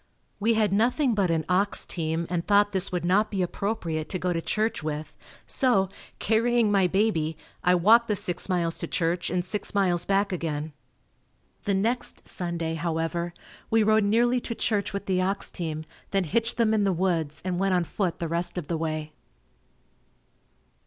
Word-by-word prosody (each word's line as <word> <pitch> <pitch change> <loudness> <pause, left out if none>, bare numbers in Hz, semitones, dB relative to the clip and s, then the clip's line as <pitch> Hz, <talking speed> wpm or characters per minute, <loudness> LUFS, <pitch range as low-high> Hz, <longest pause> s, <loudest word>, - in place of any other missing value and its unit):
We 225 +2 +2
had 215 -3 +2
nothing 245 +5 +2
but 200 -4 +1
an 160 -1 0
ox 190 +3 +1
team 165 0 -2
and 170 -1 -1
thought 205 0 +4
this 190 -1 +1
would 180 -1 -2
not 200 +5 +3
be 195 -3 -1
appropriate 170 -5 -3
to 185 - -2
go 180 0 -1
to 165 - -1
church 215 +3 -1
with, 155 0 -5 0.3
so, 235 -9 +2 0.3
carrying 230 0 +2
my 195 -2 +4
baby, 175 -6 +1 0.3
I 180 0 +4
walked 225 +7 +5
the 210 - +1
six 180 -1 -2
miles 170 -2 0
to - - -3
church 170 +1 -1
and 180 0 -1
six 205 +2 -3
miles 180 -3 +2
back 200 +1 +1
again. 155 -3 -3 0.9
The 200 - +1
next 230 +6 -1
Sunday, 170 -2 -2
however, 170 +1 -2 0.3
we 225 -1 +4
rode 215 0 +4
nearly 240 +4 +3
to 230 - -4
church 205 -3 0
with 200 - -4
the 185 -1 +1
ox 195 +2 -1
team, 160 -3 -4 0.2
then 195 -1 +1
hitched 230 +8 -1
them 225 -2 +3
in 215 -2 +2
the 195 - +2
woods 165 -4 -1
and 180 -1 -1
went 195 -1 +2
on 180 - +2
foot 180 +1 -2
the 170 - -3
rest 170 +2 -2
of 165 -5 -4
the 170 - 0
way. 155 -1 -3
185 Hz, 180 wpm, -26 LUFS, 170-210 Hz, 0.9 s, walked